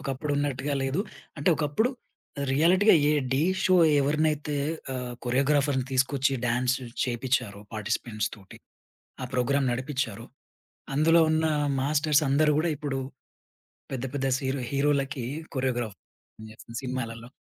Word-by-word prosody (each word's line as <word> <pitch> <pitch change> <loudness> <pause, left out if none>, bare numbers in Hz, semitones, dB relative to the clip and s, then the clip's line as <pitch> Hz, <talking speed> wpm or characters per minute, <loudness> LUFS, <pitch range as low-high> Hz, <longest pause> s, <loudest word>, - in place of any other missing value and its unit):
ఒకప్పుడు 140 0 -3
ఉన్నట్టుగా 145 0 -1
లేదు. 135 +7 0 0.4
అంటే, 140 - +1
ఒకప్పుడు 150 - +1 0.6
రియాలిటీ‌గా 180 +8 +5 0.2
ఏ - - +3 0.2
'ఢీ' 140 +4 +2 0.2
షో 185 - +5 0.2
ఎవరినైతే 150 +1 0 0.4
ఆహ్, 125 -1 -4
కొరియోగ్రాఫర్‌ని 135 +1 +2
తీసుకొచ్చి 135 +1 +2
డాన్స్ 125 +2 +1 0.3
చేపిచ్చారో 120 -4 -1
పార్టిసిపెంట్స్ 105 0 -2
తోటి 95 -1 -14 0.6
ఆ - - -1
ప్రోగ్రామ్ 135 +2 +1
నడిపిచ్చారో, 125 -4 -3 0.7
అందులో 165 +3 +5
ఉన్న 160 0 +2 0.4
మాస్టర్సందరూ 150 +1 +3
గూడా 165 +1 +1
ఇప్పుడు 140 -2 -3 0.9
పెద్ద 130 -1 -3
పెద్ద 135 -1 -1
సిరో 135 0 -2
హీరో‌లకి 140 -2 0 0.3
కొరియోగ్రాఫర్ 120 - -2 0.4
పనిచేస్తునారు 110 +2 -9
సినిమాలల్లో. 120 -2 -4
135 Hz, 110 wpm, -27 LUFS, 125-150 Hz, 0.9 s, రియాలిటీ‌గా